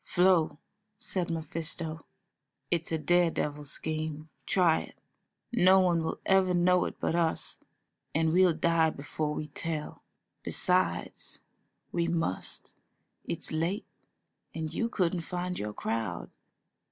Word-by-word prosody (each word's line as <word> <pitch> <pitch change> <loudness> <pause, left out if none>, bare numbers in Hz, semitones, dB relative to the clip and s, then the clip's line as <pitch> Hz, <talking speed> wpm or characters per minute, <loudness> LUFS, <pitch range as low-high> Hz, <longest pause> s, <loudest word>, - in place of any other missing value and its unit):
"Flo," 180 -4 +3 0.4
said 190 -4 -1
Mephisto, 160 0 -2 0.7
"it's 170 -1 0
a 160 - +1
dare 175 +3 +3
devil 150 -2 -2
scheme, 155 +1 -4 0.2
try 175 -4 +4
it; - - -12 0.6
no 190 -4 +6
one 175 -3 +3
will 160 - -3
ever 190 -1 +4
know 180 +1 +4
it - - -4
but - - 0
us, 165 -1 0 0.6
and 160 0 +2
we'll 185 0 +6
die 165 0 +3
before 150 +1 -3
we 155 - -4
tell. 155 0 -4 0.4
Besides, 180 0 0 0.5
we 170 -1 0
must; 165 - -2 0.5
it's - - -2
late, 170 +7 -1 0.7
and 160 -1 -3
you 230 +6 0
couldn't 180 -5 0
find 180 +1 -3
your 105 0 -3
crowd." 105 - -3
165 Hz, 125 wpm, -30 LUFS, 155-180 Hz, 0.7 s, no